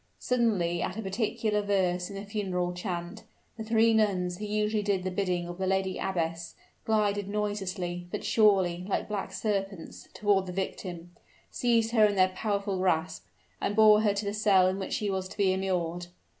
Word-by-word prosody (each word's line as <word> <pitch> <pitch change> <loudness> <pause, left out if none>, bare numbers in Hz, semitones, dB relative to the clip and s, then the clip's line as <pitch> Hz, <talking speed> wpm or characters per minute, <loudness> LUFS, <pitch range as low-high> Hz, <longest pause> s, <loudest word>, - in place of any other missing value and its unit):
Suddenly 205 -9 +1
at 185 - -3
a - - -2
particular 210 +1 -1
verse 185 -3 0
in 200 - -8
the 200 +1 -6
funeral 185 -4 -2
chant, 180 +2 -5 0.3
the 225 - -6
three 225 +1 +3
nuns 185 -5 +1
who 210 - -4
usually 210 +1 0
did 200 -3 0
the 185 - -2
bidding 180 -2 -1
of 175 +1 -8
the 190 - -1
lady 190 0 0
abbess, 170 -2 -3 0.3
glided 205 -2 +1
noiselessly 190 -4 -3
but - - -5
surely, 195 -5 +3
like - - -1
black 205 -2 -4
serpents 195 -4 -4
toward 200 -2 +2
the 180 - -5
victim 175 -2 -5 0.4
seized 230 -2 +1
her 225 -2 +4
in 205 - -1
their 185 -1 +4
powerful 200 0 -2
grasp 175 -3 0 0.4
and 205 - -1
bore 215 -1 +7
her 205 -2 +2
to 205 +1 -2
the 200 - -2
cell 200 -3 +4
in 190 +1 -1
which 190 - -4
she 205 -2 -1
was 190 -1 -2
to - - -12
be 195 -2 +3
immured. 175 -2 -2
195 Hz, 185 wpm, -28 LUFS, 180-210 Hz, 0.4 s, bore